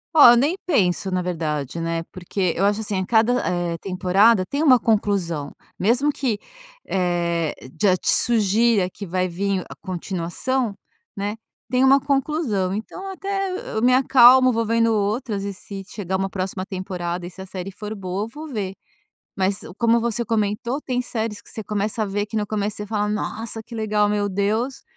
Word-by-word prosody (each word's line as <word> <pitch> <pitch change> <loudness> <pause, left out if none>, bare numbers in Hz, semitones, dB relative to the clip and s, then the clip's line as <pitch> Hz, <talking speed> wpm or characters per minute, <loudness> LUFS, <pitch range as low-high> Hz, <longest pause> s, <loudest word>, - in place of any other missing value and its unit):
Ó, 290 -6 +9
eu - - +6
nem 285 +9 +2
penso, 195 - +1
na 185 -1 0
verdade, 155 -4 -3
né, 165 0 -2
porque 185 -1 -2
eu 195 - +2
acho 205 +2 +1
assim 205 -3 -2
a 190 - -1
cada, 225 +3 +3 0.2
eh, 175 -2 -1
temporada 190 +3 +3
tem 280 +9 -2
uma 270 -5 +7
conclusão, 195 -10 0 0.3
mesmo 245 +9 +3
que, 255 -7 -1 0.5
eh, 170 -3 0 0.3
já 195 -3 +5
te - - -2
sugira 220 -3 +3
que 200 - -8
vai 185 +1 0
vim 195 +2 -1
a - - -7
continuação, 190 +6 -2 0.4
né, 205 +2 -3 0.3
tem 250 0 +2
uma 275 +1 +6
conclusão. 270 - 0
Então, 365 - -6
até, 390 0 -3 0.2
eu 220 - -1
me 250 +2 +5
acalmo, 255 0 +7
vou 230 -1 0
vendo 230 0 +2
outras 210 0 -1
e 200 - -3
se 195 0 -8
chegar 190 -3 -3
uma 195 0 -1
próxima 185 0 -3
temporada 180 -2 -4
e - - -6
se 190 - -11
a - - -7
série 185 0 -6
for 210 +2 -7
boa, 195 +1 -3
eu - - -8
vou 300 +7 -9
ver, 205 -7 -3 0.6
mas, 195 0 0 0.2
como 235 0 +3
você 235 0 -1
comentou, 225 +4 -1
tem 250 -3 -2
séries 220 -4 -4
que - - -16
você 220 - -6
começa 210 +1 -1
a - - -4
ver 205 +1 -1
que 215 +1 -3
no 210 - -1
começo 205 -1 -2
você 210 - -5
fala: 210 0 -1
"Nossa, 220 +2 -3
que 235 - -12
legal 210 -2 +1
meu 205 -1 0
Deus" 215 +7 -1
205 Hz, 185 wpm, -22 LUFS, 185-235 Hz, 0.6 s, Ó